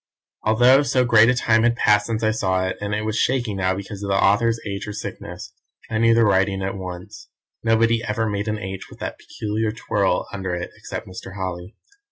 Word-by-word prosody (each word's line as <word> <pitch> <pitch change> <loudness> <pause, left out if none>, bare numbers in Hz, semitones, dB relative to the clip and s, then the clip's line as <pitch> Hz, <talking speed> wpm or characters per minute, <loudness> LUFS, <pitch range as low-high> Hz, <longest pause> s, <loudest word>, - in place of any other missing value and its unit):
Although 120 +5 +5
so 130 -3 +2
great 115 -1 +6
a 125 - +3
time 110 -2 +3
had 120 +1 +3
passed 105 -3 +3
since 115 -1 -2
I 110 - +3
saw 95 -4 0
it, 95 - -2
and 105 0 -2
it 105 0 -2
was 110 +1 -1
shaky 125 -5 +1
now 95 -1 0
because 100 +1 -7
of 100 - -4
the 100 - +2
author's 115 +3 +3
age 100 0 -4
or 105 - -5
sickness, - - -7 0.4
I 110 - 0
knew 115 0 +5
the 115 -1 +4
writing 95 -1 +2
at 95 - -2
once 90 0 -8 0.3
nobody 115 +1 +2
ever 110 0 -1
made 100 0 -2
an 105 0 -1
"H" 95 -2 -7
with - - -13
that - - -6
peculiar 110 +1 -3
twirl 100 -4 0
under 95 -2 -3
it 85 - -5
except - - -7
Mr. 95 0 -9
Holly. 95 0 -5
105 Hz, 215 wpm, -22 LUFS, 95-115 Hz, 0.4 s, great